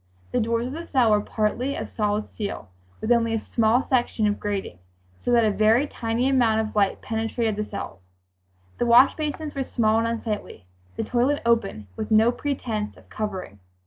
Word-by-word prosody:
The - - +1
doors 230 +1 0
of 255 - -5
the 335 +2 -6
cell 250 -5 +3
were 210 0 +4
partly 230 +6 -1
of - - -4
solid 210 -1 -1
steel 200 - -6 0.3
with 220 - -1
only 230 -1 +3
a - - 0
small 230 +3 +2
section 240 -4 +1
of 205 0 0
grating, 200 - -4 0.4
so - - -4
that 235 -2 +5
a 215 - +3
very 220 +6 +3
tiny 235 -2 -1
amount 240 -5 +3
of 215 - -12
light 200 -2 +1
penetrated 225 0 -1
the 210 - -2
cells. 95 - -8 0.7
The 240 - +1
wash 245 +3 +7
basins 305 0 -4
were 275 - -2
small 225 -3 +1
and 230 - 0
unsightly; 220 - -4 0.3
the - - -2
toilet 255 +4 +1
open, 225 - +1
with 215 - -4
no 220 +2 +5
pretense 235 -6 -3
of - - -19
covering. 190 - -5
225 Hz, 185 wpm, -24 LUFS, 210-245 Hz, 0.7 s, wash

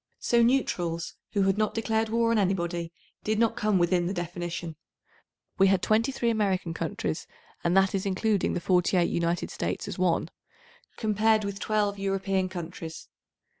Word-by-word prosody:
So 235 0 +2
neutrals 175 -9 +1 0.2
who 200 - +2
had 195 +2 +2
not 215 - 0
declared 225 0 0
war 230 +1 +2
on 230 - +3
anybody 175 -3 -1 0.3
did 215 0 0
not 230 0 +2
come 210 -2 +1
within 175 0 +2
the 190 - -2
definition. 175 -1 -4 0.8
We 195 - +6
had 190 -1 +2
23 230 +2 +2
American 195 -6 0
countries, 165 -1 -3 0.4
and 175 +2 +2
that 195 0 +4
is 195 -1 0
including 200 +1 +1
the 175 - -2
864 180 +1 +2
48 - - -1
United 170 +1 -1
States - - -3
as - - -6
one, - - +1 0.7
compared 215 0 +2
with 200 0 -4
12 205 -2 0
European 195 -1 0
countries. 170 -2 -7
195 Hz, 160 wpm, -27 LUFS, 175-215 Hz, 0.8 s, We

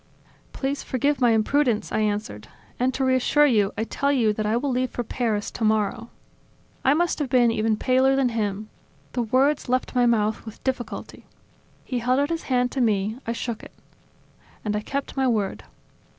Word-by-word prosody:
"Please 275 +1 -3
forgive 280 +2 0
my 245 - +5
imprudence," 230 +1 +1
I - - 0
answered. 205 - -2 0.3
"And, 255 +1 +2
to 265 - 0
reassure 260 +3 +3
you, 210 -8 +3
I 220 - 0
tell 280 +5 -1
you 230 -6 +2
that 215 0 -2
I 220 +2 +2
will 275 +3 -1
leave 255 0 0
for 245 - -4
Paris 220 -3 -2
tomorrow." 220 +1 0 0.7
I 275 - +4
must 345 0 0
have 290 -4 -2
been 245 -2 +4
even 220 -1 +1
paler 260 +3 +3
than 270 -2 +2
him; 215 -2 -3 0.4
the 245 - -1
words 260 +4 +1
left 255 +1 0
my 245 -1 +3
mouth 215 -2 +1
with 220 -1 -11
difficulty. 260 -2 -4 0.6
He 250 - -2
held 250 +3 +1
out 285 +3 0
his 330 - -3
hand 250 -1 +2
to 270 - -1
me; 215 -1 +1
I 230 - 0
shook 235 -1 -4
it. - - -13 0.9
And 210 0 0
I 210 - -1
kept 275 +5 -4
my 265 -1 +1
word. 215 -5 -1
245 Hz, 185 wpm, -24 LUFS, 215-265 Hz, 0.9 s, my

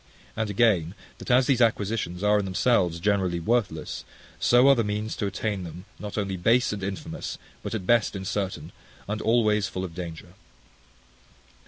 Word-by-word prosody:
And 110 -1 -1
again, 100 -5 +2 0.2
that - - -8
as 125 +1 +5
these 130 -2 +2
acquisitions 105 -5 0
are 105 0 +4
in 100 - -2
themselves 95 -3 +2
generally 95 -2 +1
worthless, 100 -5 -1 0.4
so 125 +2 +5
are 140 - +8
the 120 -3 +1
means 105 +1 -2
to 100 - -1
attain 100 0 -2
them 90 +2 -9
not 105 0 -6
only 100 -2 -1
base 115 +6 +3
and 100 - -5
infamous, 95 0 -5 0.2
but - - -4
at 100 -4 -4
best 115 0 +3
incertain, 95 -4 -3 0.4
and 105 +1 -3
always 110 -3 +2
full 95 - -4
of 90 -3 -6
danger. 85 0 -7
100 Hz, 165 wpm, -26 LUFS, 90-110 Hz, 0.4 s, are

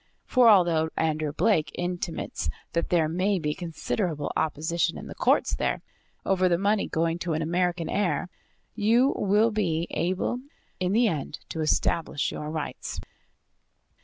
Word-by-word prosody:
For, 250 -3 +5
although 170 -6 +4
Andrew 155 -2 0
Blake 160 0 +2
intimates 175 - -3 0.2
that 170 - 0
there 165 -3 +3
may 185 +5 +1
be 150 -3 -1
considerable 165 -2 -3
opposition 160 +2 0
in - - -8
the - - -7
courts - - +2
there, - - -1 0.4
over 185 -1 +3
the 170 - +3
money 200 +2 +1
going 165 +1 0
to 175 -2 -2
an 160 +1 -1
American 175 0 0
heir, 180 -5 0 0.5
you 230 +5 +3
will 210 +3 +3
be 170 -6 0
able 185 +7 -1 0.4
in 185 0 0
the 235 +2 +4
end 155 -8 -3
to 160 - -3
establish 155 -1 0
your 150 - -5
rights. 155 -1 -4
175 Hz, 145 wpm, -26 LUFS, 160-195 Hz, 0.5 s, For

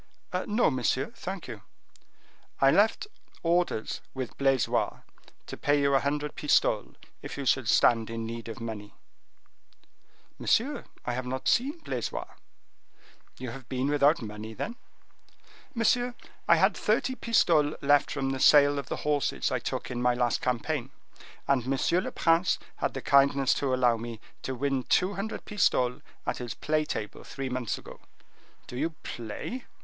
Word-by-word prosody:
"No, 215 -4 +3
monsieur, 130 - 0
thank 190 -4 -6
you." 110 -5 -8 1.0
"I 135 0 +6
left 215 - +3 0.4
orders 170 -9 0
with 130 -2 -4
Blaisois 135 -4 +1 0.4
to - - -7
pay 145 0 +2
you 140 0 +2
a 135 - +5
hundred 145 +1 -2
pistoles, 150 - +1 0.3
if - - -7
you 140 - -4
should 130 -3 +2
stand 115 -2 +4
in 115 0 -4
need 115 0 -6
of 115 0 -7
money." 110 -3 -7 1.4
"Monsieur, 275 +6 +1 0.2
I 125 - -1
have 125 +1 -3
not 130 +1 -3
seen 275 +7 +2
Blaisois." - - -3 1.1
"You 125 -2 -5
have 130 -1 -11
been 130 +2 -1
without 145 -1 +3
money, 110 +1 -7
then?" 230 - -4 1.0
"Monsieur, 245 +2 +2 0.3
I - - +7
had - - +3
thirty 260 - +1
pistoles 165 - +3
left 145 +1 +4
from 135 -2 -1
the 135 - -3
sale 145 +1 +6
of 140 - -6
the - - -4
horses 135 - 0
I - - 0
took - - -4
in 120 -1 -3
my 125 0 +3
last 120 -1 +1
campaign, 125 +2 -1 0.6
and 135 -2 +1
M. 170 +7 +2
le - - -4
Prince 165 +1 +3 0.2
had - - -2
the - - -5
kindness 140 -1 +4
to 140 -2 -1
allow 125 -2 +3
me 115 -1 -7 0.2
to 130 - -4
win 135 +1 0
two 185 +9 +2
hundred 200 +3 -5
pistoles 130 -11 +1 0.2
at - - -1
his 120 -2 -5
play 155 0 0
table 105 -7 -5
three 135 -1 -5
months 125 -3 -2
ago." - - -12 0.7
"Do - - -9
you 160 +5 -2
play? 120 - -6
135 Hz, 155 wpm, -28 LUFS, 120-155 Hz, 1.4 s, I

